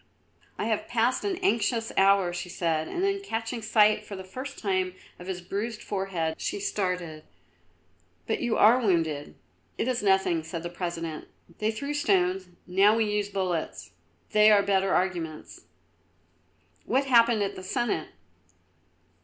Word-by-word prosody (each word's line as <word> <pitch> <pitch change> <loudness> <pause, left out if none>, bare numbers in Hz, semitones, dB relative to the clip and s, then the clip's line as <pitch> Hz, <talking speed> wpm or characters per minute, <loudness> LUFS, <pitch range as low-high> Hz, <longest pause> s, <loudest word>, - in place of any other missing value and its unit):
"I - - -2
have 220 -2 -1
passed 240 +1 +1
an 395 -3 -1
anxious 230 - +1
hour," 195 -2 +4
she 175 +1 -5
said, 160 -3 -1
and 360 - -3
then, 395 0 +1
catching 230 - -4
sight 215 -1 +3
for 200 - -8
the 190 - -7
first 260 +9 -7
time 185 -2 -1 0.2
of 180 - -10
his 185 -1 -4
bruised 210 +5 -4
forehead, 185 -5 -3
she - - -2
started. 180 - -2 1.0
"But - - -1
you 240 -2 0
are 230 +4 +6
wounded." 165 - 0 0.4
"It - - -1
is 255 -2 0
nothing," 190 -4 +2
said 165 +1 -6
the 175 - -4
President. 170 -3 -5 0.3
"They 215 - +1
threw 280 +7 -3
stones; 190 -8 +1 0.2
now, 195 +4 +4
we 225 -1 +2
used 210 -1 -1
bullets; 185 -4 -3 0.4
they 210 0 +6
are 205 -1 +5
better 195 -1 +1
arguments." 170 -4 -2 1.2
"What 270 +1 +1
happened 235 -4 +4
at 195 - -3
the - - -8
Senate?" 185 -4 -2
200 Hz, 150 wpm, -27 LUFS, 180-225 Hz, 1.2 s, are